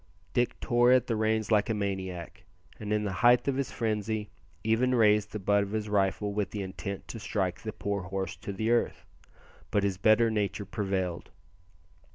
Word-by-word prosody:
Dick 120 Hz, 0 st, 0 dB
tore 120 Hz, +1 st, +3 dB
at 130 Hz, -1 st, +5 dB
the 115 Hz, -, -1 dB
reins 110 Hz, 0 st, 0 dB
like 105 Hz, +1 st, +3 dB
a 110 Hz, -, +1 dB
maniac, 95 Hz, -5 st, -4 dB, 0.4 s
and 105 Hz, -1 st, -5 dB
in 105 Hz, 0 st, +1 dB
the 100 Hz, -, -2 dB
height 120 Hz, +2 st, +5 dB
of 140 Hz, -, +1 dB
his 135 Hz, 0 st, -1 dB
frenzy 110 Hz, -1 st, -2 dB, 0.3 s
even 120 Hz, +3 st, +2 dB
raised 105 Hz, -2 st, +4 dB
the -, -, -3 dB
butt 100 Hz, 0 st, +2 dB
of 100 Hz, +1 st, -4 dB
his 110 Hz, -1 st, -2 dB
rifle 100 Hz, 0 st, +1 dB
with 105 Hz, -1 st, -1 dB
the 105 Hz, -2 st, -4 dB
intent 95 Hz, +1 st, -6 dB
to 115 Hz, -, -6 dB
strike 90 Hz, -3 st, -2 dB
the 110 Hz, -, -4 dB
poor 100 Hz, -1 st, -3 dB
horse 95 Hz, -1 st, -4 dB
to -, -, -6 dB
the 110 Hz, +4 st, -1 dB
earth, 120 Hz, -, 0 dB, 0.6 s
but 105 Hz, -, +1 dB
his 100 Hz, -2 st, 0 dB
better 110 Hz, +3 st, +4 dB
nature 105 Hz, -1 st, -1 dB
prevailed. 95 Hz, -5 st, -2 dB
105 Hz, 190 wpm, -29 LUFS, 100-110 Hz, 0.6 s, at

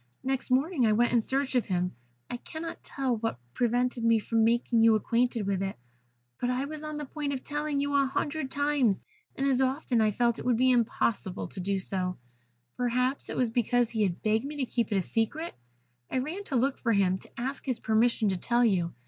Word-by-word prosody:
Next 265 Hz, 0 st, -1 dB
morning 265 Hz, 0 st, +2 dB
I 215 Hz, -, +4 dB
went 235 Hz, +3 st, +3 dB
in 235 Hz, -, +4 dB
search 270 Hz, +4 st, 0 dB
of 250 Hz, -3 st, +1 dB
him. 180 Hz, -1 st, 0 dB, 0.3 s
I 245 Hz, -, -4 dB
cannot 320 Hz, +6 st, -7 dB
tell 260 Hz, -4 st, -1 dB
what 225 Hz, -, -2 dB, 0.2 s
prevented 245 Hz, 0 st, +1 dB
me 230 Hz, 0 st, +5 dB
from 225 Hz, +1 st, +1 dB
making 235 Hz, 0 st, +2 dB
you 225 Hz, -1 st, +6 dB
acquainted 230 Hz, +1 st, +1 dB
with 195 Hz, -1 st, 0 dB
it, 195 Hz, 0 st, -2 dB, 0.6 s
but 245 Hz, -, 0 dB
I 255 Hz, +2 st, 0 dB
was 305 Hz, +1 st, -6 dB
on 305 Hz, -1 st, -4 dB
the 295 Hz, -, -4 dB
point 285 Hz, 0 st, -3 dB
of 265 Hz, -, -4 dB
telling 295 Hz, -1 st, -2 dB
you 285 Hz, 0 st, -1 dB
a 280 Hz, -1 st, +4 dB
hundred 290 Hz, +1 st, -2 dB
times, 280 Hz, -7 st, +2 dB, 0.4 s
and 275 Hz, -, -1 dB
as 265 Hz, -2 st, +3 dB
often 260 Hz, -3 st, +1 dB
I 215 Hz, -, +4 dB
felt 235 Hz, +2 st, +1 dB
it -, -, -7 dB
would 245 Hz, -2 st, +3 dB
be 255 Hz, +2 st, +4 dB
impossible 230 Hz, -5 st, 0 dB
to -, -, -8 dB
do 195 Hz, +2 st, 0 dB
so 185 Hz, -1 st, -2 dB, 0.6 s
perhaps 250 Hz, +2 st, 0 dB
it -, -, -4 dB
was 245 Hz, -3 st, +1 dB
because 240 Hz, 0 st, +1 dB
he 220 Hz, -, -1 dB
had 185 Hz, -4 st, 0 dB
begged 220 Hz, +1 st, +2 dB
me 290 Hz, +2 st, -5 dB
to 280 Hz, -3 st, -1 dB
keep 235 Hz, -3 st, -1 dB
it 205 Hz, -, +2 dB
a 190 Hz, -, +1 dB
secret. 265 Hz, -, -2 dB, 0.6 s
I -, -, -1 dB
ran 320 Hz, +10 st, -3 dB
to 275 Hz, -, -3 dB
look 260 Hz, +3 st, +1 dB
for 230 Hz, -2 st, +1 dB
him, 190 Hz, -2 st, +2 dB
to -, -, -14 dB
ask 265 Hz, +3 st, -3 dB
his 255 Hz, -4 st, -1 dB
permission 220 Hz, 0 st, +2 dB
to 190 Hz, -, 0 dB
tell 240 Hz, +6 st, +2 dB
you. 175 Hz, -, +1 dB
245 Hz, 220 wpm, -29 LUFS, 220-270 Hz, 0.6 s, you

